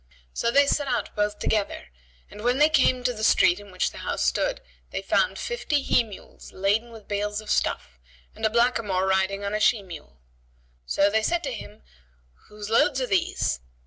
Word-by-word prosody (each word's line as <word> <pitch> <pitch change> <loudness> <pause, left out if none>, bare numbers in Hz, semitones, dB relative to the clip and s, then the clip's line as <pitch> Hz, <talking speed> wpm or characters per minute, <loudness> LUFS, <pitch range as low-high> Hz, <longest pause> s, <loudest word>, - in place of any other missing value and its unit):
So 235 - 0
they 280 +4 +5
set 285 0 0
out 240 -5 -2
both 210 0 0
together 210 -2 -2 0.4
and, 210 - -10
when 245 +2 +2
they 300 +2 +5
came 255 -4 +3
to 250 0 +1
the 215 -1 -7
street 185 -4 +4
in 205 0 -13
which 185 - -1
the - - -10
house - - -2
stood, - - 0 0.3
they - - -5
found - - +1
fifty 305 - -1
he - - +3
mules 210 -4 -13
laden 205 +5 0
with 225 -2 -13
bales 205 0 -2
of 215 -1 -6
stuffs, 65 -1 -1 0.3
and - - -13
a 220 - +4
blackamoor 230 -5 +1
riding 190 +1 0
on 200 +1 -3
a 215 - 0
she 215 -1 +3
mule. 160 - -11 0.7
So 200 - +2
they 220 +1 +2
said 340 +9 0
to 270 -3 -3
him, 105 - -10 0.6
"Whose 210 0 -8
loads 275 +3 +3
are 255 - 0
these?" 190 - 0
215 Hz, 195 wpm, -25 LUFS, 200-250 Hz, 0.7 s, they